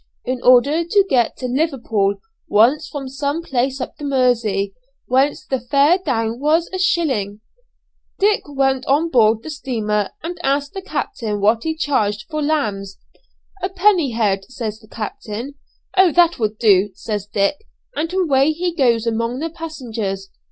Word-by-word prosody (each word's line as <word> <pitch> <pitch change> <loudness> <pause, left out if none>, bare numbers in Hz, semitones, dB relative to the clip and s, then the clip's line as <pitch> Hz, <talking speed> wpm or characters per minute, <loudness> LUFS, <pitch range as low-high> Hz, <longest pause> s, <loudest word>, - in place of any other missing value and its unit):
In 255 0 -2
order 270 +7 +5
to 390 +4 +3
get 245 - +1
to 255 - -5
Liverpool 245 -8 0 0.3
once 270 +9 +3
from 280 -2 -6
some 285 +4 -3
place 265 -2 -1
up 255 - -6
the - - -10
Mersey, 235 -8 +1 0.3
whence 265 +3 +1
the 265 - -1
fare 280 +8 +3
down 230 -8 -1
was 315 +4 +2
a 375 - -2
shilling, 260 - 0 0.8
Dick 415 +1 +3
went 270 -2 +1
on 310 +5 +2
board 225 -3 +4
the 315 - -6
steamer 215 -8 -2
and 345 +2 -5
asked 280 0 0
the 385 - -5
captain 230 - -3
what 215 +3 +3
he 320 0 -2
charged 210 -9 0
for 305 0 -2
lambs. 210 -11 -1 0.6
'A 370 - -1
penny 370 - +2
a - - -6
head,' 195 -4 +1
says 220 -3 -5
the 215 - -19
captain. 220 +4 -6 0.4
'Oh! 375 -2 +5
that 345 -3 +4
will 215 -1 -1
do,' 205 -3 +4
says 210 -2 -4
Dick; 205 +7 0 0.4
and 325 +2 -2
away 310 -6 +2
he 350 +2 -2
goes 240 -7 +2
among 230 +2 -1
the 325 +3 -3
passengers. 225 - -5
260 Hz, 160 wpm, -19 LUFS, 220-315 Hz, 0.8 s, order